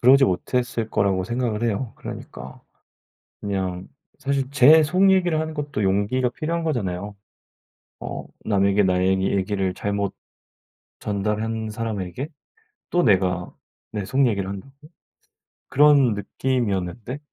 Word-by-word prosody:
그러지 135 +3 +7
못 95 +4 -2
했을 120 -3 0
거라고 95 -2 +1
생각을 120 -1 -2
해요. 115 +1 -1
그러니까 65 0 -9 0.8
그냥 95 -2 -3 0.3
사실 135 -1 -1
제 150 +3 +7
속 185 +5 +4
얘기를 175 -4 +2
하는 160 0 -3
것도 145 -8 -3
용기가 105 +6 +1
필요한 165 +6 -3
거잖아요. 100 - -2 0.8
어 - - -6 0.2
'남에게 100 -1 +3
나의 95 +1 +2
얘기를 95 -1 0
잘못 100 -1 -2 0.9
전달한 110 +2 -2
사람에게 110 - -4 0.6
또 175 - +2
내가 90 -5 +2 0.4
내 105 -3 -3
속 135 +4 +2
얘기를 100 -5 0
한다고?' 100 +7 -7 1.0
그런 140 -5 +5
느낌이었는데. 115 +1 -2
110 Hz, 270 characters per minute, -23 LUFS, 95-135 Hz, 1.0 s, 그러지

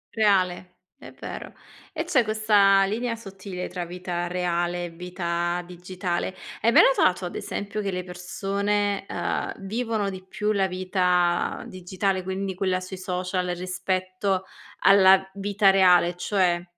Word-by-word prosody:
Reale, 185 -4 +1 0.2
è - - -11
vero. - - -8 0.4
E 320 - -3
c'è 310 -8 +3
questa 210 -2 +4
linea 230 +4 -2
sottile 195 -4 -7
tra 180 - -5
vita 175 0 -4
reale 175 0 -1
e 175 - -6
vita 175 0 -2
digitale. 180 +1 -4 0.3
Hai 230 - +4
mai - - +8
notato, 185 0 +2
ad 175 - -6
esempio, 205 +1 -4
che 200 - -2
le 180 -1 -3
persone, 200 +3 -2
uhm, - - -2
vivono 220 -1 -1
di 185 -1 -8
più 210 +2 -2
la 195 -2 +2
vita 180 -1 +1
digitale, 185 +1 -2
quindi 190 +1 -3
quella 185 0 0
sui 185 +1 -7
social 180 0 -2
rispetto 185 +1 -2 0.4
alla 190 -1 +6
vita 200 0 +3
reale, 180 -2 +5
cioè, 180 -2 +1
185 Hz, 135 wpm, -25 LUFS, 180-200 Hz, 0.4 s, mai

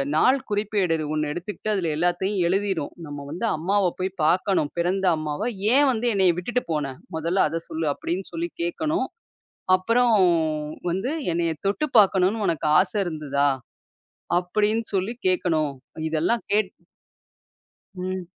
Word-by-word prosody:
நாள் 255 - +4
குறிப்பேடுது 200 -7 0
ஒண்ணு 150 -1 -1
எடுத்துக்கிட்டு, 210 +5 -4
அதுல 180 -5 0
எல்லாத்தையும் 180 +4 +1
எழுதீரும். 190 -4 -1
நம்ம 145 -1 -7
வந்து 180 +8 -3
அம்மாவப் 185 +2 +1
போய் 185 +1 -1
பாக்கணும். 180 -1 +2
பிறந்த 185 +3 0
அம்மாவ. 155 +9 -2 0.2
"ஏன் 285 +1 +6
வந்து 240 0 0
என்னைய 190 -4 +4
விட்டுட்டு 240 +7 -1
போன? 140 -3 -2 0.2
முதல்ல 170 +4 +1
அதை 165 +1 -2
சொல்லு" 160 -1 -2
அப்படின்னு 180 +6 -4
சொல்லி 340 +1 -2
கேக்கணும். 335 -1 -1 0.7
அப்புறம் 230 +5 +2 0.8
வந்து 190 +9 -1 0.2
"என்னைய 170 -1 0
தொட்டுப் 260 +7 -1
பாக்கணும்னு 200 +1 +4
உனக்கு 160 -3 0
ஆசை 195 +3 0
இருந்ததா?" 145 -3 0 0.9
அப்படின்னு 210 +5 0
சொல்லி 195 +4 0 0.2
கேக்கணும். 160 -5 +1 0.4
இதெல்லாம் 170 +9 0
கேட் 210 -2 +2 1.2
ம். 185 0 -4
185 Hz, 125 wpm, -24 LUFS, 165-210 Hz, 1.2 s, ஏன்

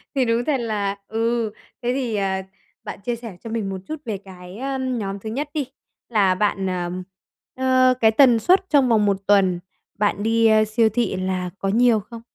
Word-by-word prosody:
Thì 260 - +2
đúng 230 +1 +1
thật 290 -3 +1
là 205 -3 -2
ừ, 225 0 -1 0.3
thế 245 +1 0
thì, 250 -5 -2
ờ, 190 -1 0 0.4
bạn - - -7
chia 240 +3 -2
sẻ 225 -6 -9
cho 225 - -6
mình 220 -3 -2
một 190 - -4
chút 315 - -3
về 215 -4 -3
cái, 185 0 -12
ờ, 270 +1 -3
nhóm 225 -7 -3
thứ 220 +2 -6
nhất 285 +6 -3
đi, 295 -4 -1 0.4
là 195 -5 +3
bạn, 195 -1 0
ờ, 175 -1 -2 0.6
ờ, 255 0 +4
cái 220 -1 +5
tần 240 -1 +5
suất 370 - +3
trong 275 -5 +4
vòng 215 -2 +3
1 200 -1 +2
tuần 190 -3 +4 0.4
bạn 205 0 +1
đi, 225 0 +3
a, 215 0 +5
siêu 220 +1 +2
thị 235 +3 -1
là 185 -1 -2
có 195 - -2
nhiều 230 +1 +4
không? 225 +3 -10
220 Hz, 205 wpm, -22 LUFS, 195-245 Hz, 0.6 s, cái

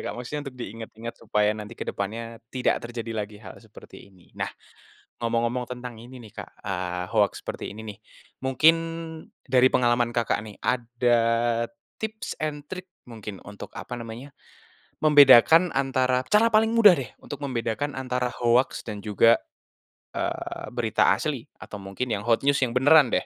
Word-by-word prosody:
Kak, - - -3
maksudnya 145 +4 -5
untuk 125 - -13
diingat-ingat 115 0 -7
supaya 105 -1 +1
nanti 110 +1 -8
ke - - -5
depannya 115 +3 -4 0.2
tidak 130 - +1
terjadi 115 -1 -5
lagi 105 0 -14
hal - - -10
seperti - - -14
ini. 95 -3 -23
Nah, - - -1 0.7
ngomong-ngomong 120 +1 -1
tentang 125 -2 -7
ini 125 +2 -11
nih, 110 -4 -13
Kak, - - -15 0.2
eee, 90 -2 -2
hoaks 105 -2 +2
seperti - - -5
ini 110 +2 -9
nih, 100 - -25 0.4
mungkin 135 +5 +5 0.7
dari 130 -1 +5
pengalaman 120 -1 +2
Kakak 120 -2 0
nih, 105 -2 -10
ada 120 0 +1 0.8
tips 220 0 -5
and 145 -1 -3
trick 185 +1 -8 0.2
mungkin 110 -4 -8
untuk 100 0 -9
apa 125 - -6
nama 115 -1 -7
nya, 140 +3 -10 0.7
membedakan 150 +3 +7
antara 130 -1 +1
cara 215 - +4
paling 220 +1 +3
mudah 210 -5 +8
deh, 130 - -5
untuk 145 - -7
membedakan 130 +2 -2
antara 125 -1 -2
hoaks 120 +2 +2
dan 105 -3 -6
juga, 115 +2 +4 0.8
eee, - - -4
berita 120 -6 +2
asli 130 +2 -3 0.2
atau 100 -1 -9
mungkin 100 +6 -4
yang 100 - -2
hot 115 +4 +1
news 140 0 +4
yang 130 - +2
beneran 145 +1 +6
deh. - - 0
120 Hz, 160 wpm, -25 LUFS, 110-135 Hz, 0.8 s, mudah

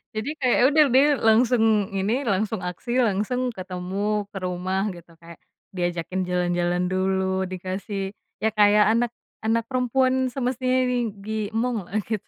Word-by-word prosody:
Jadi 220 +6 -2
kayak 250 -2 +3
ya - - +4
udah 305 +1 +5
dia 270 +2 +6 0.2
langsung 230 +1 +4 0.3
ini, 195 +4 0
langsung 205 +1 0
aksi, 180 +7 -5
langsung 240 +3 0
ketemu 185 0 -6 0.4
ke - - -6
rumah 185 +1 -2
gitu. 170 0 -14
Kayak 170 -1 -13 0.3
diajakin 175 0 -2
jalan-jalan 175 0 0
dulu, 190 0 0
dikasih 190 +2 -4 0.3
ya 220 - +2
kayak 210 0 +5
anak 235 0 +1 0.3
anak 230 +1 +2
perempuan 260 +1 +1
semestinya 255 0 0
di 250 - 0 0.3
diemonglah, 220 -1 -2
gitu, 215 -1 -4
205 Hz, 135 wpm, -24 LUFS, 185-240 Hz, 0.4 s, dia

